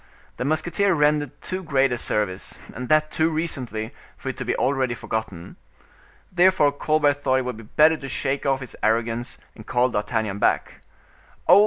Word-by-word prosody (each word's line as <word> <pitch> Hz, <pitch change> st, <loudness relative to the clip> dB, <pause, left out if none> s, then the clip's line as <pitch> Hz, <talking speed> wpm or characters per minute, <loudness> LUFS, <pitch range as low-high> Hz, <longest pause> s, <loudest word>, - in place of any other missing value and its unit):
The 125 Hz, -, -2 dB
musketeer 170 Hz, +6 st, +1 dB
had -, -, -3 dB
rendered 150 Hz, -2 st, +1 dB
too 185 Hz, 0 st, -3 dB
great 135 Hz, -6 st, +2 dB
a 125 Hz, -, 0 dB
service, 105 Hz, -5 st, -1 dB, 0.2 s
and 125 Hz, 0 st, -6 dB
that 155 Hz, 0 st, +3 dB
too 160 Hz, +1 st, +2 dB
recently, 130 Hz, -9 st, -3 dB, 0.2 s
for -, -, -5 dB
it -, -, -5 dB
to -, -, -3 dB
be -, -, 0 dB
already 130 Hz, -3 st, 0 dB
forgotten. 110 Hz, -8 st, -5 dB, 0.7 s
Therefore 180 Hz, -5 st, +4 dB
Colbert 145 Hz, 0 st, +1 dB
thought 130 Hz, -, +2 dB
it 130 Hz, -, -1 dB
would 125 Hz, -3 st, -4 dB
be -, -, -9 dB
better 155 Hz, +8 st, +4 dB
to 135 Hz, -2 st, -7 dB
shake 135 Hz, +2 st, -1 dB
off 135 Hz, -1 st, +1 dB
his 130 Hz, -, -8 dB
arrogance 115 Hz, +2 st, 0 dB, 0.2 s
and 110 Hz, -, -13 dB
call 125 Hz, +1 st, +2 dB
D'Artagnan 105 Hz, -2 st, -2 dB
back. -, -, 0 dB, 0.7 s
"Ho! -, -, +8 dB
135 Hz, 180 wpm, -24 LUFS, 115-155 Hz, 0.7 s, Ho